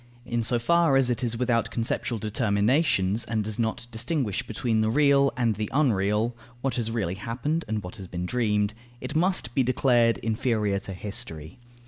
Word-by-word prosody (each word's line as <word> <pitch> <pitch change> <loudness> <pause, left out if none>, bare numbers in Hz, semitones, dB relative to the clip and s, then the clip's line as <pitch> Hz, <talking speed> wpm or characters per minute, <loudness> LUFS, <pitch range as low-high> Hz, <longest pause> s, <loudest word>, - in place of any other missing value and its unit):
In 120 -1 -1
so 120 +2 +2
far 165 +4 +3
as 130 -2 +3
it 125 +1 -1
is 115 -1 0
without 120 -1 +1
conceptual 115 0 -2
determinations 105 - +1
and 110 -1 -1
does 110 +1 -3
not 115 +1 -1
distinguish 115 - -1
between 110 0 -1
the 110 - +1
real 140 +1 +4
and 120 -3 +2
the 105 0 -3
unreal, 110 -4 +1 0.3
what 135 0 -1
has 115 -2 -1
really 110 -7 -1
happened 125 - -2
and 105 -1 -2
what 90 - -8
has 95 - -8
been 90 0 -4
dreamed, 105 -1 0 0.3
it 130 - -6
must 170 -7 +1
be 135 - +2
declared 120 -2 +3
inferior 110 -3 0
to 95 0 -7
History. 90 -4 -5
115 Hz, 175 wpm, -26 LUFS, 105-125 Hz, 0.3 s, real